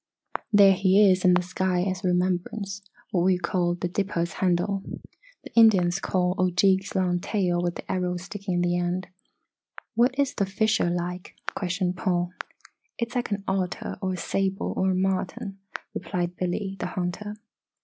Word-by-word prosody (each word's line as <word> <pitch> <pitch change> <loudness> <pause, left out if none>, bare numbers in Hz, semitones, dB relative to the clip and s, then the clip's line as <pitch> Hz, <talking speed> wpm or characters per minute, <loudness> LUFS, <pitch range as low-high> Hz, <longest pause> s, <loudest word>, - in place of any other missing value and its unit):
"There 200 -2 +7
he 195 +1 +5
is 185 0 +1
in 180 -1 +6
the 180 - +2
sky 180 0 0
as 185 -1 -2
a - - +1
remembrance. 185 +3 -1 0.3
What 180 - +2
we 185 0 +4
call 175 -1 0
the 175 - -2
'Dipper's 175 -2 -1
Handle,' 190 +2 +1 0.6
the - - -12
Indians 195 -6 +5
call 180 -2 +1
Ojeeg's 190 +2 +2
long 180 -2 +1
tail 180 -3 0
with 175 0 -1
the - - -6
arrow 180 -1 -1
sticking 195 +1 -5
in 175 - +1
the 175 0 +1
end." 175 +1 -2 0.8
"What 245 +3 +2
is 280 -1 +1
the 200 - 0
fisher 215 -1 +1
like?" 175 +1 -4 0.2
questioned 180 -1 -1
Paul. 180 -2 0 0.7
"It's 235 0 -3
like 245 -2 -1
an 200 -1 -2
otter 190 +3 -2
or 190 -1 -1
a - - -4
sable 195 +2 -1
or 190 - +1
a 185 - +1
marten," 190 +1 -2 0.3
replied 175 0 -3
Billy, 190 +2 -2
the - - -2
hunter. 180 +4 -4
185 Hz, 165 wpm, -26 LUFS, 180-195 Hz, 0.8 s, There